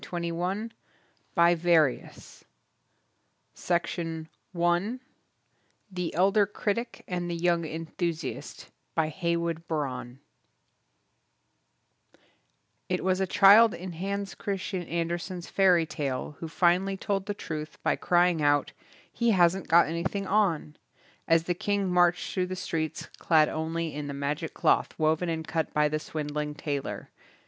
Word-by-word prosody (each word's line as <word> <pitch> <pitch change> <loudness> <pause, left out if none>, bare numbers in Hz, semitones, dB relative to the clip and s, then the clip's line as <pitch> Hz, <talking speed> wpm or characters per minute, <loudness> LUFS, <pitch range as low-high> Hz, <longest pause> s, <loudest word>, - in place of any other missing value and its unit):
LIII, 170 -1 -2
NO. - - -4
1 195 +6 -2 0.6
THE - - -2 2.2
BQDKMAN 175 +4 -2 0.9
THE 180 -2 -3
ELDER 195 +3 +4
CRITIC 210 +3 -3
AND 175 -1 -3
THE 170 - -2
YOUNG 170 -1 +1
ENTHUSIAST 165 -1 -5 0.2
By 160 -1 +1
Heywood 170 0 -2
Broun 130 -5 -3 2.7
IT 180 0 -1
was 185 0 +1
a 190 - +1
child 205 +4 +7
in 185 +1 -7
Hans 195 +3 -3
Christian 195 -2 -3
An 170 0 -1
dersen's 175 +1 -5
fairy 180 -4 +4
tale 145 -2 -4
who 165 - -5
finally 180 +4 +2
told 195 0 -2
the 205 - -2
truth 155 -4 -6
by - - +2
crying 175 -2 +2
out, 145 -1 +2 0.4
"He 235 0 +1
hasn't 185 -2 +3
got 170 +1 +6
anything 170 +5 -2
on", 185 -7 +1 0.5
as 165 0 +4
the 175 - -1
king 200 +2 -1
marched 180 -1 +2
through 185 -1 0
the 185 - -4
streets 160 -3 -3
clad 155 -2 +4
only 160 0 -3
in 145 0 -5
the 140 - -5
magic 145 +3 -3
cloth - - +2
woven 160 +2 +1
and 160 -1 -3
cut 160 -2 -1
by 150 0 +4
the 155 +1 -1
swindling 150 -1 -4
tailor. 145 -2 -4
170 Hz, 130 wpm, -28 LUFS, 160-185 Hz, 2.7 s, child